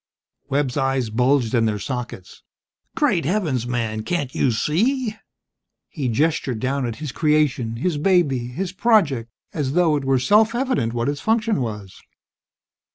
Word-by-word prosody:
Webb's 140 -2 0
eyes 135 -4 0
bulged 125 0 +2
in 115 -2 +3
their 105 -1 0
sockets. 125 +4 -6 0.5
"Great 275 - +2
heavens, 155 - -1
man, 115 -3 -2
can't 140 +2 -2
you - - +1
see?" 215 - 0 0.7
He 140 -6 -3
gestured 130 -1 0
down 130 +1 -1
at 115 - -4
his 150 -1 -6
creation, 150 -6 +1
his 150 +5 -1
baby, 145 -9 +2
his 175 +10 -4
project, 165 - +2 0.2
as 140 -4 -2
though 170 -2 +3
it 145 - -2
were 135 0 +2
self 210 - +3
evident 245 - 0
what 120 +1 -1
its 145 0 -2
function 225 - +1
was. 105 -5 -6
140 Hz, 150 wpm, -22 LUFS, 120-175 Hz, 0.7 s, in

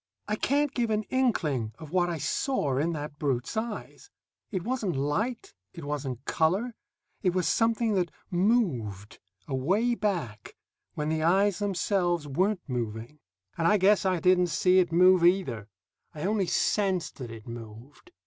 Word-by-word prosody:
I 210 - 0
can't 285 +5 +1
give 240 -4 0
an 215 0 0
inkling 155 - 0
of 155 -2 -11
what 175 -1 +2
I 170 - -2
saw 150 - -1
in 165 +4 0
that 150 -1 -6
brute's 135 - -1
eyes; 220 - -5 0.4
it 185 -5 -3
wasn't 230 - -2
light, 180 - -2 0.2
it 170 - -9
wasn't 140 -3 -4
color; 190 +10 +1 0.5
it 180 -3 +1
was 180 -4 +1
something 225 +3 +2
that 180 -3 +1 0.2
moved, 160 - 0 0.3
away 190 - +1
back, 170 - -3 0.4
when 150 0 -2
the 160 0 0
eyes 190 +4 +3
themselves 180 -4 0
weren't 185 +6 0
moving. 120 +2 -4 0.4
And 165 - +3
I 210 - +5
guess 200 +1 +4
I 185 -2 +1
didn't 180 0 +4
see 180 +2 +3
it 175 -2 +1
move, 180 +1 +5
either; 170 - +2 0.5
I 150 - -6
only 200 -1 +1
sensed 190 -4 0
that 125 -4 -7
it 115 0 -10
moved. 115 - -11
175 Hz, 155 wpm, -28 LUFS, 145-205 Hz, 0.5 s, I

